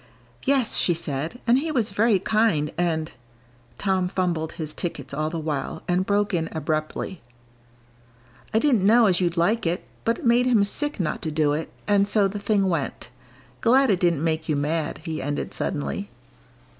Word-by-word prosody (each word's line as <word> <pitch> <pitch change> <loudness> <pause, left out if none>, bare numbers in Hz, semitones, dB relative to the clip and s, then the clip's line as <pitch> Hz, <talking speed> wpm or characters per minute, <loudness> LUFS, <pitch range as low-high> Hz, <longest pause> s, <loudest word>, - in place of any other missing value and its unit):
"Yes," 270 -4 +2
she 175 - +3
said, 160 - -3
"and 245 +2 +4
he 315 +3 -2
was 235 -8 0
very 210 +1 +3
kind 195 -7 +1
and 160 -2 -1 0.3
" 120 0 -31
Tom 190 -2 +1
fumbled 175 -4 -1
his 155 -3 -5
tickets 145 -7 -5
all 155 +2 -1
the 165 - -4
while, 150 -4 -3
and 180 +1 +1
broke 205 0 +1
in 165 -2 0
abruptly. 155 +3 -3 1.3
"I - - +2
didn't 245 -3 +3
know 225 +4 +6
as 185 -3 +3
you'd 175 -1 0
like 205 +4 +2
it, 175 +2 -2 0.2
but 230 0 +1
it - - -9
made 240 +2 +4
him 230 -5 +4
sick 295 +8 -1
not 165 -5 -2
to 160 - -3
do 150 -1 +1
it, 155 +2 -3 0.2
and 200 -1 +3
so 205 -1 +3
the 205 +2 -5
thing 200 -1 +1
went. 145 -8 -3 0.5
Glad 260 +1 +4
it 185 - +1
didn't 170 -5 +1
make 160 -1 -1
you 155 - +2
mad," 150 +2 -2
he 160 -2 -4
ended 145 +2 -3
suddenly. 200 +7 -3
180 Hz, 180 wpm, -24 LUFS, 155-210 Hz, 1.3 s, know